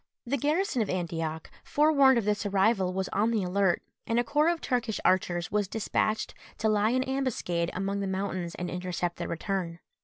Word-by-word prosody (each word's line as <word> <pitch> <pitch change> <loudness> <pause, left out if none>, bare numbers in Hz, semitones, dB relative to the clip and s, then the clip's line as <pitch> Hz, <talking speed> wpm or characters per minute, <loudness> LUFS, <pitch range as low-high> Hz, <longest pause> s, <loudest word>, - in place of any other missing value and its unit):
The 255 +4 0
garrison 300 - +1
of 210 - -1
Antioch, 165 -3 -3
forewarned 280 -4 +4
of 230 - 0
this 210 0 0
arrival, 195 -1 +2
was 190 0 -2
on 210 +3 +1
the 220 -4 +1
alert, 185 0 +1 0.2
and 230 +1 +2
a - - +3
corps 295 +6 +2
of 340 -1 0
Turkish 240 -6 -1
archers 175 -2 +1
was 205 -1 +1
despatched 215 +1 -1 0.2
to 220 - 0
lie 210 0 +3
in 255 +2 +2
ambuscade 255 -11 -1
among 195 +2 -1
the 200 - -2
mountains 190 -2 -3
and 180 - -4
intercept 180 -1 -3
their - - -4
return. 170 -1 -3
200 Hz, 185 wpm, -28 LUFS, 180-240 Hz, 0.2 s, forewarned